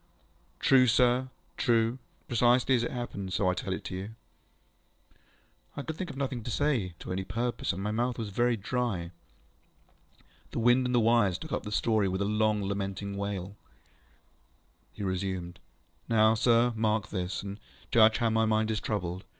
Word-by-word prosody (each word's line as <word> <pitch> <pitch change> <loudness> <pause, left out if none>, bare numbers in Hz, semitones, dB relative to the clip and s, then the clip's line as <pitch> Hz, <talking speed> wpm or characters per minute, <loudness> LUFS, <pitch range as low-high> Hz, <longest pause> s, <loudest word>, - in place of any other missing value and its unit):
ŌĆ£True, 130 -2 +5
sir. 125 +2 +3 0.3
True. 115 0 +2 0.3
Precisely 120 +2 +3
as 120 - +3
it 120 - -1
happened, 100 -6 -5
so 95 - +1
I 90 - +3
tell 95 - -4
it 95 - -4
you. 95 +2 -4
ŌĆØ 110 - -12 1.6
I - - -2
could 160 - -5
think 180 +1 -5
of 135 - -8
nothing 135 -3 -2
to 120 - -6
say, 120 - 0
to - - -8
any 95 +1 -2
purpose, 115 +5 -2
and 95 +1 -5
my 105 - -1
mouth 120 +2 -1
was 110 -3 -4
very 120 +4 +1
dry. 100 -5 -2 1.4
The - - -7
wind 120 +2 +4
and 125 - 0
the - - +5
wires 110 -5 +3
took 155 - -9
up - - -1
the 105 - -7
story 110 -1 +2
with 95 +1 -1
a - - -1
long 105 0 +1
lamenting 100 0 -3
wail. 100 -1 -4 1.4
He - - -7
resumed. 95 -2 -3 0.5
ŌĆ£Now, 110 -1 +4
sir, 115 +1 +3
mark 110 -1 0
this, 90 -1 -3
and 100 +1 -7 0.3
judge 110 -1 +6
how 115 -2 +1
my 110 0 +2
mind 110 0 +1
is 110 - -1
troubled. 95 -4 -3
110 Hz, 175 wpm, -29 LUFS, 100-120 Hz, 1.6 s, judge